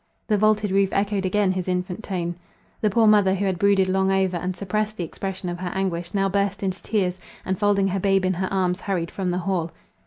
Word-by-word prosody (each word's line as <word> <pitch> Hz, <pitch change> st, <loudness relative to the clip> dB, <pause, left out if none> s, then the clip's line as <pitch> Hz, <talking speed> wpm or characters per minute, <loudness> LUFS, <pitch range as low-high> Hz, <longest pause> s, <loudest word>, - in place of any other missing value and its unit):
The 215 Hz, -, +2 dB
vaulted 215 Hz, -1 st, +2 dB
roof 195 Hz, 0 st, +3 dB
echoed 200 Hz, -1 st, 0 dB
again 200 Hz, 0 st, +2 dB
his 185 Hz, -1 st, -3 dB
infant 180 Hz, +3 st, -2 dB
tone. 175 Hz, -4 st, -2 dB, 0.5 s
The 215 Hz, -, +3 dB
poor 225 Hz, +3 st, +3 dB
mother 205 Hz, -3 st, +5 dB
who 200 Hz, +1 st, -1 dB
had 185 Hz, -3 st, -1 dB
brooded 200 Hz, -1 st, +4 dB
long 190 Hz, +1 st, +2 dB
over, 190 Hz, -1 st, +1 dB
and 180 Hz, +2 st, -3 dB
suppressed 215 Hz, +3 st, -2 dB
the 175 Hz, -, -2 dB
expression 190 Hz, +3 st, -5 dB
of 175 Hz, 0 st, -4 dB
her 180 Hz, -1 st, -3 dB
anguish, 175 Hz, -3 st, -2 dB
now 195 Hz, 0 st, +2 dB
burst 200 Hz, 0 st, -1 dB
into 190 Hz, -1 st, -2 dB
tears, 185 Hz, -4 st, -1 dB, 0.3 s
and 190 Hz, +1 st, -2 dB
folding 200 Hz, -2 st, +2 dB
her 195 Hz, +1 st, -1 dB
babe 195 Hz, 0 st, +2 dB
in 185 Hz, -, +2 dB
her 185 Hz, +1 st, -3 dB
arms, 185 Hz, -1 st, 0 dB
hurried 175 Hz, -4 st, -2 dB
from 190 Hz, -2 st, -2 dB
the 180 Hz, -, 0 dB
hall. 175 Hz, -2 st, -1 dB
190 Hz, 225 wpm, -24 LUFS, 185-200 Hz, 0.5 s, mother